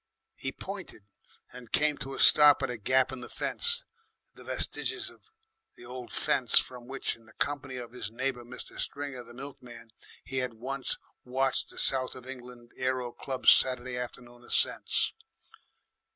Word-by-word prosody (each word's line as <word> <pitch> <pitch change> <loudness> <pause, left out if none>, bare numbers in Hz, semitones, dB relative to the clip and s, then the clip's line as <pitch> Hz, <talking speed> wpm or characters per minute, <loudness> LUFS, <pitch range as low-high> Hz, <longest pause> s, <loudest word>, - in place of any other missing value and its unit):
He - - -3
pointed, 100 - -8 0.5
and 125 -2 -11
came 150 -1 +3
to 135 -1 -5
a - - -7
stop 150 -1 +8
at - - 0
a 120 - -5
gap 130 +4 +3
in 130 -1 -6
the 120 - -8
fence, 475 +1 +1 0.5
the - - -12
vestiges - - -1
of - - -21 0.5
the - - -12
old 125 0 -7
fence - - +2
from 125 -2 +1
which, 135 +1 -3
in 115 -1 -21
the 110 - -17
company 140 -2 -1
of 120 -2 -6
his 120 -5 -5
neighbour 125 +2 -2
Mr. 125 +1 -9
Stringer 140 -3 -4
the 120 0 -13
milkman, 125 -4 -10 0.3
he 135 - -5
had 125 -2 -1
once 130 +3 -3 0.3
watched 130 +1 +1
the - - -11
South 130 -1 +4
of 130 - -10
England 125 -2 -10
Aero 130 -1 0
Club's 130 +2 +4
Saturday 125 -1 +3
afternoon 120 0 -7
ascents. - - +1
125 Hz, 165 wpm, -30 LUFS, 120-135 Hz, 0.5 s, stop